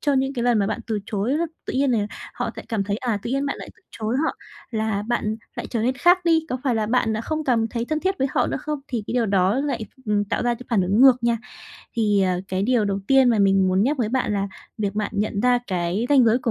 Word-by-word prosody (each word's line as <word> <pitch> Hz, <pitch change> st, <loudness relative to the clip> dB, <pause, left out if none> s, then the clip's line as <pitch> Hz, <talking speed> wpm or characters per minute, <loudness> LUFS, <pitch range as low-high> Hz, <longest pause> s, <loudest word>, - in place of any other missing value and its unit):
cho 290 Hz, -, +1 dB
những 270 Hz, 0 st, +1 dB
cái 240 Hz, -, -2 dB
lần 240 Hz, -2 st, +3 dB
mà 200 Hz, -, +2 dB
bạn -, -, -2 dB
từ 220 Hz, -2 st, -1 dB
chối 220 Hz, +7 st, -1 dB
đó. 340 Hz, -, 0 dB, 0.2 s
Tự -, -, -3 dB
nhiên 270 Hz, +1 st, +2 dB
là 215 Hz, -4 st, +1 dB, 0.3 s
họ -, -, -2 dB
sẽ -, -, -6 dB
cảm 215 Hz, -4 st, -1 dB
thấy, 200 Hz, +1 st, -1 dB
à, 230 Hz, -3 st, -1 dB
tự -, -, -4 dB
nhiên 275 Hz, +2 st, 0 dB
bạn 280 Hz, -, -2 dB
lại -, -, -8 dB
từ -, -, -27 dB
chối 220 Hz, +2 st, -2 dB
họ -, -, -1 dB, 0.3 s
là 220 Hz, -3 st, -1 dB
bạn 220 Hz, -1 st, -1 dB, 0.2 s
lại -, -, -4 dB
trở 230 Hz, -3 st, -1 dB
nên 255 Hz, +3 st, +1 dB
khác 355 Hz, +6 st, +4 dB
đi, 325 Hz, -1 st, +3 dB
có 255 Hz, -, -2 dB
phải 255 Hz, -3 st, +2 dB
là 220 Hz, -1 st, 0 dB
bạn 225 Hz, -1 st, +1 dB
đã 220 Hz, -, -2 dB
không 310 Hz, +6 st, -3 dB
cảm 230 Hz, -4 st, +2 dB
thấy 230 Hz, 0 st, -3 dB
thân 310 Hz, +4 st, -2 dB
thiết 380 Hz, +2 st, -1 dB
với 270 Hz, -, +1 dB
họ -, -, +1 dB
nữa -, -, -2 dB
không, 300 Hz, +1 st, -4 dB
thì 235 Hz, -4 st, -3 dB
cái -, -, -4 dB
điều 240 Hz, -2 st, +2 dB
đó 195 Hz, 0 st, +2 dB
lại, 270 Hz, -6 st, -2 dB, 0.2 s
ừm, 205 Hz, -1 st, +1 dB
tạo 200 Hz, -, -2 dB
ra 240 Hz, 0 st, +1 dB
cái 245 Hz, -, -10 dB
phản 215 Hz, -5 st, +3 dB
ứng 195 Hz, +5 st, +1 dB
ngược 255 Hz, -2 st, +7 dB
nha. 235 Hz, 0 st, +2 dB, 0.6 s
Thì, 210 Hz, -3 st, +3 dB
ờ, 180 Hz, -1 st, +1 dB
cái 190 Hz, +1 st, -1 dB
điều 235 Hz, -1 st, +2 dB
đầu 200 Hz, -1 st, -1 dB
tiên 270 Hz, -2 st, +5 dB
mà 225 Hz, -, +2 dB
mình 195 Hz, -1 st, +4 dB
muốn 185 Hz, +1 st, +2 dB
nhắc 280 Hz, +7 st, +1 dB
với 230 Hz, -4 st, 0 dB
bạn 250 Hz, -2 st, 0 dB
là 200 Hz, 0 st, -1 dB, 0.3 s
việc 205 Hz, -2 st, -1 dB
bạn 210 Hz, -1 st, -1 dB
nhận 205 Hz, 0 st, -1 dB
ra 250 Hz, +1 st, +4 dB
cái 185 Hz, +4 st, -1 dB
ranh 275 Hz, -4 st, +6 dB
giới 230 Hz, +1 st, +4 dB
của 245 Hz, -2 st, -1 dB
230 Hz, 285 wpm, -23 LUFS, 205-260 Hz, 0.6 s, ngược